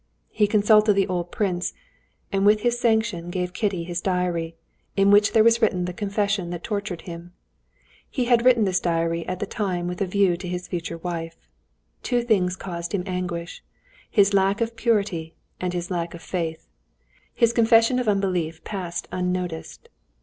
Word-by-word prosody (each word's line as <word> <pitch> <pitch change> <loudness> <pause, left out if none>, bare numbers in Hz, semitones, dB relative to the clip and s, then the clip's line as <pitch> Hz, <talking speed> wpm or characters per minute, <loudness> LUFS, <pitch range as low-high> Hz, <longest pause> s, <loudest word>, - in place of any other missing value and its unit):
He 210 - +2
consulted 210 0 +5
the 195 -1 +2
old 175 -1 -3
prince, 180 -4 -1 0.6
and 195 0 +1
with 210 +1 +5
his 240 +1 +1
sanction 220 -7 +1
gave 180 0 -3
Kitty 195 -4 -1
his 175 0 -4
diary, 175 -3 -1 0.4
in 195 0 +5
which 205 +1 +5
there 220 - +6
was 230 +1 +4
written 185 -5 +2
the 180 - -4
confession 200 -1 -1
that 175 -1 -6
tortured 200 -5 -3
him. 170 0 -9 0.8
He 255 -4 -1
had 240 -1 +3
written 245 -4 +5
this 190 -1 +1
diary 165 -1 -1
at 185 - -2
the - - -1
time 185 -5 -2
with 180 +1 -5
a 195 - +1
view 185 -2 +2
to 180 +1 -7
his 180 0 -4
future 170 -1 -4
wife. 165 -1 -5 0.6
Two 245 -1 0
things 185 -6 +2
caused 170 0 -5
him 180 - -1
anguish: 180 -2 -4 0.5
his 200 -2 +4
lack 195 +1 +3
of 230 0 -1
purity 205 -8 0 0.2
and 180 -1 -2
his 175 0 -4
lack 170 -1 -2
of 165 - -11
faith. 165 -3 -4 0.7
His 235 -2 +3
confession 230 +2 +4
of 250 - -2
unbelief 180 -6 0
passed 180 -4 -5
unnoticed. 180 -2 -3
185 Hz, 170 wpm, -24 LUFS, 175-210 Hz, 0.8 s, there